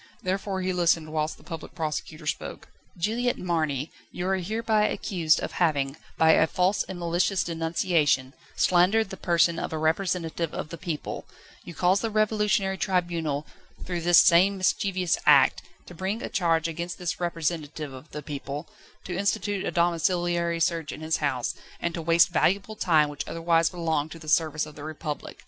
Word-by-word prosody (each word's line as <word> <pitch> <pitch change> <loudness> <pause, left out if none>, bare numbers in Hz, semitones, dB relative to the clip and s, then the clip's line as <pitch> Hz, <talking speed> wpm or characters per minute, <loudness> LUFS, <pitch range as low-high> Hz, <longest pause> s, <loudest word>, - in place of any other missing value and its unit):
Therefore 190 0 -2
he 185 0 0
listened 165 -3 +1
whilst 155 0 -1
the - - -19
Public 165 -3 -8
Prosecutor 155 0 -4
spoke. 155 +1 -4 0.3
"Juliette 230 +7 0
Marny, 155 -5 -1 0.2
you 180 - -4
are 190 0 +2
hereby 215 +3 +1
accused 170 -4 +1
of - - -4
having, 145 -5 +1 0.2
by 160 0 +6
a 160 - +5
false 185 +4 +1
and 190 - -5
malicious 175 +2 +1
denunciation, 165 -5 +1 0.2
slandered 190 +4 +3
the - - -5
person 170 -2 +2
of - - -4
a 160 - -2
representative 165 0 -1
of - - -4
the 170 - -7
people; 165 -5 -5 0.4
you 170 - -10
caused 185 +2 +3
the 225 - -1
Revolutionary 210 -3 +1
Tribunal, 170 -5 -1 0.4
through 175 -2 -3
this 175 0 +6
same 185 +3 +5
mischievous 185 -1 +1
act, - - +6 0.2
to - - -11
bring 190 +6 -3
a - - -4
charge 165 -3 +1
against 170 +2 -5
this 180 -2 -3
representative 160 -4 -3
of 130 +4 -11
the 150 0 -7
people, 145 +1 -6 0.4
to 175 - -5
institute 200 0 -1
a - - -1
domiciliary 170 0 +1
search 165 -2 0
in - - -8
his 160 +1 0
house, 130 -5 -1 0.3
and 170 - -2
to 165 - -4
waste 170 +2 +4
valuable 195 +4 +1
time, 160 -7 +3
which 145 -1 -6
otherwise 165 0 +2
belonged 160 -4 -1
to - - -8
the 160 -1 -13
service 155 -1 +2
of 150 - -11
the 145 - -10
Republic. 155 -1 -6
170 Hz, 170 wpm, -26 LUFS, 155-185 Hz, 0.4 s, by